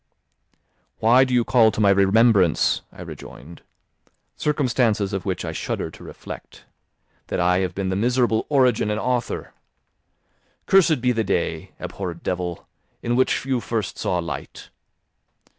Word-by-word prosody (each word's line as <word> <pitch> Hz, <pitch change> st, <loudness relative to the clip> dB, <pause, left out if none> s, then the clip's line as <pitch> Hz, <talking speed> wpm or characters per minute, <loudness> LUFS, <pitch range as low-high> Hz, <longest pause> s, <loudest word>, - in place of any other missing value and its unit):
"Why 120 Hz, +4 st, +5 dB
do 130 Hz, -, -2 dB
you 125 Hz, -1 st, +3 dB
call 115 Hz, -2 st, +4 dB
to 105 Hz, -, -5 dB
my 100 Hz, -2 st, +5 dB
remembrance," 100 Hz, -2 st, +3 dB
I -, -, -10 dB
rejoined, 80 Hz, +7 st, -11 dB, 0.7 s
"circumstances 120 Hz, -8 st, 0 dB
of 95 Hz, 0 st, -3 dB
which 90 Hz, -2 st, -2 dB
I 80 Hz, -, -3 dB
shudder -, -, -4 dB
to -, -, -14 dB
reflect, -, -, -10 dB, 0.6 s
that -, -, -2 dB
I 90 Hz, +1 st, +3 dB
have 90 Hz, -2 st, -2 dB
been 95 Hz, -1 st, -2 dB
the 95 Hz, -, -1 dB
miserable 120 Hz, +1 st, +1 dB
origin 125 Hz, -7 st, +3 dB
and 105 Hz, 0 st, -1 dB
author? 125 Hz, 0 st, -2 dB, 1.1 s
Cursed 170 Hz, -8 st, +4 dB
be 125 Hz, 0 st, +2 dB
the 115 Hz, -2 st, 0 dB
day, 100 Hz, -, -2 dB
abhorred 90 Hz, -4 st, -6 dB
devil, 90 Hz, -1 st, -3 dB, 0.4 s
in 120 Hz, 0 st, 0 dB
which 130 Hz, +1 st, +1 dB
you 130 Hz, -2 st, 0 dB
first 115 Hz, -4 st, -3 dB
saw 90 Hz, -, 0 dB
light! 85 Hz, 0 st, -6 dB
110 Hz, 140 wpm, -23 LUFS, 95-125 Hz, 1.1 s, Why